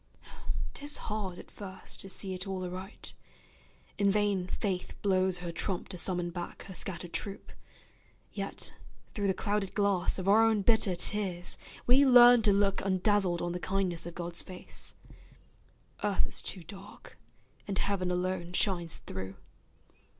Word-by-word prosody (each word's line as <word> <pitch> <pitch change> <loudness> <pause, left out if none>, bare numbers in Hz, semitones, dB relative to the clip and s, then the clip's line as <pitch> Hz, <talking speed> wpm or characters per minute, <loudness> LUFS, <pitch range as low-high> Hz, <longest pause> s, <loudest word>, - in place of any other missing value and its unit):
'Tis 290 +1 -2
hard 205 -4 -4
at - - -12
first 190 -2 -7
to 195 - -8
see 190 0 -1
it 180 +1 -3
all 190 -1 -3
aright; 185 +3 -6 0.9
In 200 -1 +4
vain 200 -3 +1
Faith 185 -1 -3
blows 190 -2 +2
her 175 -1 -5
trump 175 +2 -2
to 190 - -4
summon 175 -1 +2
back 175 0 -6
Her 195 - -9
scattered 175 -2 -4
troop; 200 -1 -3 0.8
yet, - - -2 0.4
through 205 -2 -1
the 190 - +1
clouded 205 -1 -1
glass 200 -3 +2
Of 185 0 -4
our 215 +3 +6
own 220 -3 +3
bitter 220 -4 +3
tears, 180 -1 +1 0.3
we 260 +3 +6
learn 245 -2 +8
to 215 -2 +5
look 200 0 +2
Undazzled 190 -2 +2
on 175 - -1
the 180 - -3
kindness 180 -3 -1
of 170 - -8
God's 170 -1 -3
face; 185 -1 -4 1.1
Earth 205 -2 +2
is - - -2
too 185 - -3
dark, 195 +5 -12 0.5
and 195 -2 -1
Heaven 195 -2 0
alone 180 -1 -2
shines 175 -4 +1
through. 95 0 -6
190 Hz, 150 wpm, -31 LUFS, 180-205 Hz, 1.1 s, learn